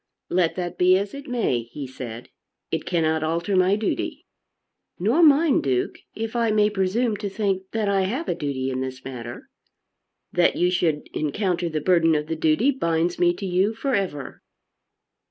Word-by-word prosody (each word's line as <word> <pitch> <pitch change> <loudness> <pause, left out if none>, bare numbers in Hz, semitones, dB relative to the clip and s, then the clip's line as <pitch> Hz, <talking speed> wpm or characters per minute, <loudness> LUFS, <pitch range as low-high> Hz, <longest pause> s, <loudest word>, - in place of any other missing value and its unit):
"Let 175 -2 +2
that 180 -1 -4
be 185 +1 +6
as 200 +1 -3
it 280 +1 -8
may," 230 - 0
he 120 +5 -8
said, 120 -2 -8 0.4
"it 160 -1 -2
cannot 160 -2 +1
alter 170 +5 -1
my 185 +2 +4
duty." 215 +1 -3 0.7
"Nor 225 - +2
mine, 305 -1 +5
Duke, 130 -2 -1 0.2
if 225 +1 -4
I 230 -1 +2
may 210 0 +3
presume 210 +4 0
to 205 0 -4
think 195 -2 -2
that 220 -2 -1
I 200 -1 +2
have 260 - -3
a - - +1
duty 140 -5 -3
in 130 0 -2
this 130 0 -6
matter." 120 -2 -8 0.8
"That 175 -1 +3
you 180 +1 +2
should 165 -4 0
encounter 175 +3 -1
the 155 -1 -2
burden 165 -1 +4
of 150 0 0
the 160 +1 -3
duty 160 - +3
binds 170 -8 0
me 175 -1 +4
to 200 - -6
you 190 +4 +1
for 270 +4 -2
ever." 180 - -3
180 Hz, 175 wpm, -24 LUFS, 155-210 Hz, 0.8 s, be